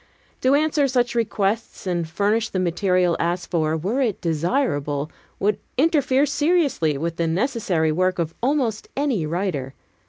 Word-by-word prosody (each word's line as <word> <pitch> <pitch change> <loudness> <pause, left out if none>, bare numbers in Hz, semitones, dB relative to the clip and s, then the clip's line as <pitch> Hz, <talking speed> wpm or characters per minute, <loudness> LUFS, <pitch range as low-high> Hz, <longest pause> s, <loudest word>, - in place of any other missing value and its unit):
To 260 +2 +4
answer 300 -1 +2
such 245 -2 +1
requests 220 -2 -1
and 175 -3 -1
furnish 210 +6 +1
the - - -3
material 180 -1 +1
asked 175 +1 -2
for, 160 -2 +1
were 205 - -1
it 225 -7 0
desirable, 155 - -1 0.3
would 210 +2 +1 0.2
interfere 285 -2 +3
seriously 285 - +1
with 165 +3 -3
the 170 - 0
necessary 180 - 0
work 185 +3 +1
of 165 -2 -2
almost 250 -4 0
any 260 - 0
writer. 155 -6 -2
195 Hz, 145 wpm, -22 LUFS, 165-255 Hz, 0.3 s, To